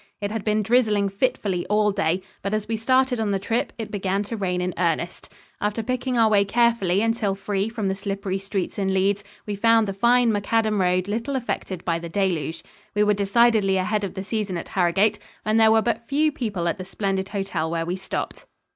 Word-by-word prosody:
It 205 0 -3
had 220 -2 -3
been 215 0 +1
drizzling 215 -3 +2
fitfully 200 -4 -1
all 210 0 +3
day, 185 -2 0 0.2
but 200 +2 -1
as 215 0 -3
we 225 - -1
started 255 +2 +2
on 220 -2 0
the 200 - +1
trip, 225 +5 -1
it 225 -2 -5
began 195 0 -1
to 220 +3 -5
rain 185 -4 -1
in 180 0 -2
earnest. 170 0 -2 0.3
After 210 +2 -1
picking 255 +1 -1
our 225 -1 +5
way 205 -2 +4
carefully 210 -3 +2
until 225 -3 0
free 200 +1 -2
from 225 -3 -3
the 190 - +1
slippery 195 -1 -3
streets 195 0 -3
in 190 -1 0
Leeds, 200 +2 +1 0.2
we 210 - -3
found 225 +1 +3
the 195 - -2
fine 235 +3 +4
macadam 215 0 +1
road 180 +1 +1
little 230 +7 -2
affected 200 -7 -3
by 165 -1 0
the 170 0 -7
deluge. 165 -4 -1 0.3
We 210 - +4
were 210 0 +3
decidedly 205 -1 +3
ahead 210 +3 0
of 195 - -4
the 190 - -4
season 205 -3 -2
at - - -7
Harrogate, 195 +4 +2 0.3
and 215 +1 +3
there 220 0 +6
were 220 0 +4
but 235 -1 -2
few 305 +2 +2
people 210 -11 -3
at 170 - -1
the - - -4
splendid 195 -1 -2
hotel 195 -6 -2
where 165 0 -1
we 175 +2 -2
stopped. 190 0 -5
205 Hz, 210 wpm, -24 LUFS, 190-225 Hz, 0.3 s, there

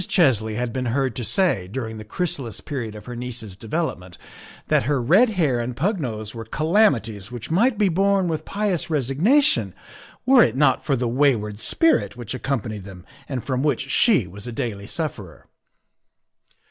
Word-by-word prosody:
Chesley 110 - +2
had 120 0 -2
been 130 -1 -2
heard 130 0 0
to 125 - -2
say, 130 - +2
during 110 +1 -5
the - - -7
chrysalis 120 - -3
period 120 -7 -5
of 105 - -10
her 125 - -7
niece's 120 -5 -5
development, 105 - -4 0.5
that - - +2
her 145 -2 +2
red 185 - +4
hair 155 - +1
and 120 +1 -3
pug 190 +6 0
nose 110 -5 -5
were 115 -1 -6
calamities 115 - +1
which 120 +3 -7
might 220 +7 +3
be 205 -1 +3
borne 195 +1 +2
with 160 -2 -2
pious 200 -4 -2
resignation 165 - +2 0.5
were 260 -1 +6
it - - +3
not 145 - +3
for 140 - +1
the 125 -1 -1
wayward 115 -5 +1
spirit 320 - +1
which 120 -1 -6
accompanied 115 -6 -3
them 95 -2 -11 0.2
and 130 -4 -3
from 130 -2 -1
which 150 0 -1
she 205 - +4
was 100 +5 -8
a - - -4
daily 115 -5 -4
sufferer. 115 - -5
125 Hz, 170 wpm, -23 LUFS, 110-165 Hz, 0.5 s, were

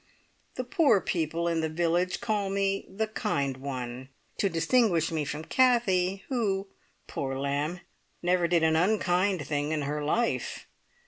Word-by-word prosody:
The 255 - -2
poor 255 - +3
people 170 -1 -1
in 165 -1 +1
the 160 - -1
village 175 +4 0
call 210 -4 0
me 195 0 0
"the 210 +3 -1
kind 140 -10 -2
one," 130 -1 -5 0.3
to 200 - +2
distinguish 170 -1 +2
me 160 -2 -1
from 150 +2 -4
Kathie, 195 -7 +2
who, 205 -7 0 0.4
poor 135 -1 -3
lamb! 145 +5 -2 0.4
never 175 0 +2
did 170 -1 +2
an 160 0 +4
unkind 185 -2 +2
thing 145 +1 -1
in 155 -2 -1
her 150 +1 -2
life. 230 +11 -1
175 Hz, 145 wpm, -28 LUFS, 150-200 Hz, 0.4 s, an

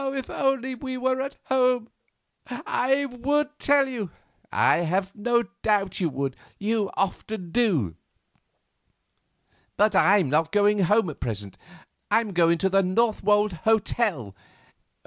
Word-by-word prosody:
if 265 -2 -5
only 270 -1 0
we 260 0 -5
were 260 +1 0
at 275 +1 -5
home, 250 -3 +2 0.6
I 260 +2 0
would 285 +4 -1
tell 285 -1 +3
you——" 230 -8 -5 0.4
"I - - +3
have 185 +3 -1
no 235 +3 +1 0.2
doubt 200 -3 0
you 175 -4 +1
would—you 195 - -3
often 195 -1 -3
do; 165 - +1 1.8
but 210 +1 +3
I'm 185 0 +4
not 160 +4 +1
going 205 0 +3
home 195 -1 +2
at - - -14
present. 105 -5 -5 0.5
I - - +4
am 220 -4 -5
going 170 -1 +3
to 190 +3 0
the 195 +1 +3
Northwold 210 +1 +1
hotel." 195 - 0
210 Hz, 125 wpm, -25 LUFS, 180-250 Hz, 1.8 s, I'm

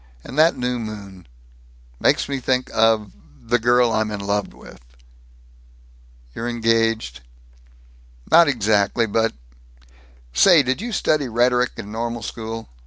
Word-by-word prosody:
And - - -10
that 160 +1 +4
new 125 -1 -2
moon 100 -5 -9 0.7
Makes - - +2
me 140 -1 -3
think 130 0 -1
of 110 -2 +2 0.3
the 120 +1 0
girl 120 +1 +3
I'm 110 -1 0
in 105 -1 -5
love 100 0 -2
with." - - -15 1.5
"You're 115 - -4
engaged?" 115 - 0
wistfully. - - -28 1.0
"Not 170 -1 +7
exactly 110 -3 +1
but 115 +1 0 1.0
Say, 175 -7 +6
did 130 +6 -2
you 240 +1 -5
study 155 - 0
rhetoric 125 +2 +1
in 105 - -8
Normal 115 0 -4
School? 115 0 -6
115 Hz, 130 wpm, -21 LUFS, 110-125 Hz, 1.5 s, Not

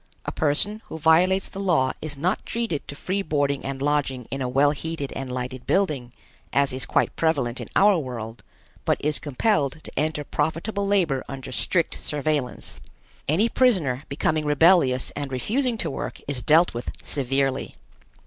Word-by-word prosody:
A - - -2
person 180 +9 +2
who - - -7
violates 175 +4 +4
the 195 - -8
law 165 -10 +2
is 150 -2 -4
not 175 +6 0
treated 230 -11 -3
to 145 - -6
free 190 +6 -2
boarding 145 -5 0
and 135 0 -4
lodging 140 -4 0
in 135 - -3
a 125 - -1
well 140 +3 +4
heated 150 -1 -4
and 135 -1 -5
lighted 125 0 -5
building, 150 -11 +1 0.4
as 140 -2 +3
is 130 - -4
quite - - +1
prevalent 140 -7 0
in - - -8
our 200 -2 +5
world, 120 -5 -6 0.4
but - - +2
is 150 0 +2
compelled 150 - 0
to - - -8
enter 155 0 0
profitable 165 +9 -1
labor 170 -10 +2
under 135 -1 -7
strict 170 +5 0
surveillance. 145 -3 -2 0.5
Any 185 +10 +3
prisoner 185 - +2
becoming 155 +2 0
rebellious 150 -4 +4
and 140 -2 -5
refusing 230 - 0
to - - -2
work - - -5
is 140 -3 -1
dealt 165 +6 +4
with 120 +1 -5
severely. 135 0 -1
145 Hz, 165 wpm, -24 LUFS, 135-175 Hz, 0.5 s, our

